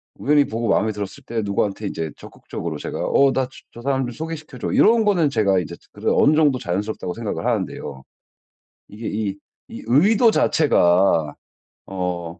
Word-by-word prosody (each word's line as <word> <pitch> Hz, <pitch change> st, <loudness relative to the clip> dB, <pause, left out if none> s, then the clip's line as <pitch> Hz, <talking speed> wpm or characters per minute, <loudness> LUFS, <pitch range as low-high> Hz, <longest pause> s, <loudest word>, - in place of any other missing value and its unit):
우연히 145 Hz, 0 st, +3 dB
보고 115 Hz, +1 st, -3 dB
마음에 110 Hz, 0 st, +2 dB
들었을 100 Hz, -2 st, -7 dB
때 115 Hz, -1 st, -2 dB
누구한테 100 Hz, +1 st, -1 dB
인제 80 Hz, -4 st, -4 dB
적극적으로 -, -, -7 dB
제가 -, -, -6 dB
"어 140 Hz, -1 st, +4 dB
나 130 Hz, -1 st, 0 dB, 0.3 s
저 120 Hz, -, -10 dB
사람 135 Hz, 0 st, 0 dB
좀 -, -, -5 dB
소개시켜 155 Hz, 0 st, -7 dB
줘." -, -, -3 dB
이런 225 Hz, 0 st, +4 dB
거는 175 Hz, -8 st, +3 dB
제가 100 Hz, -7 st, +2 dB
인제 85 Hz, 0 st, -6 dB, 0.2 s
그래도 -, -, -1 dB
어느 150 Hz, +2 st, +5 dB
정도 145 Hz, -5 st, +3 dB
자연스럽다고 100 Hz, -3 st, -3 dB
생각을 115 Hz, +1 st, -4 dB
하는데요. 95 Hz, -, -3 dB, 0.9 s
이게 110 Hz, +3 st, -7 dB
이 100 Hz, -2 st, -3 dB, 0.3 s
이 -, -, -9 dB
의도 205 Hz, -, +4 dB
자체가 90 Hz, -, +3 dB, 0.5 s
어 90 Hz, -3 st, -4 dB
110 Hz, 360 characters per minute, -21 LUFS, 95-140 Hz, 0.9 s, 어느